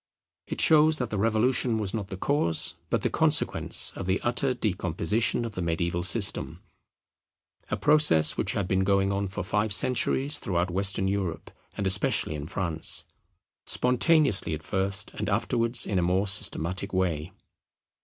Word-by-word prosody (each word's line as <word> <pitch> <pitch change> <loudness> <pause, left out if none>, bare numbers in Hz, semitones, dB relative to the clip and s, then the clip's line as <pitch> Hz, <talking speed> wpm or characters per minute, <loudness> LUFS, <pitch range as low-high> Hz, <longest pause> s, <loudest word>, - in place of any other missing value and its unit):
It - - -6
shows 155 0 +5
that 125 -4 -4
the 105 - -2
Revolution 115 +2 +1
was 105 -4 -3
not 105 -3 -4
the 95 - -7
cause 95 - 0 0.2
but - - -1
the - - +1
consequence - - +2
of 95 - -6
the 95 +1 0
utter 125 +2 0
decomposition 100 +2 -1
of 115 - -6
the 90 - -5
mediaeval 85 +1 -2
system; 100 +3 0 1.1
a - - -2
process 150 - +4
which - - -1
had 100 -3 -2
been 95 +1 0
going 100 0 +1
on 100 0 -2
for 95 +1 -5
five 105 +3 -1
centuries 130 +7 +1
throughout 90 -1 -2
Western 95 +1 0
Europe, 95 -4 -3 0.3
and 100 - -3
especially 95 -4 +2
in 75 0 -6
France; 85 -3 -2 0.6
spontaneously 125 - +2
at 80 - -11
first, 95 +3 -2
and - - -4
afterwards 115 +1 +1
in 95 -3 -1
a - - +1
more 90 +3 +1
systematic 95 -1 +1
way. 90 -3 -1
100 Hz, 155 wpm, -26 LUFS, 90-115 Hz, 1.1 s, shows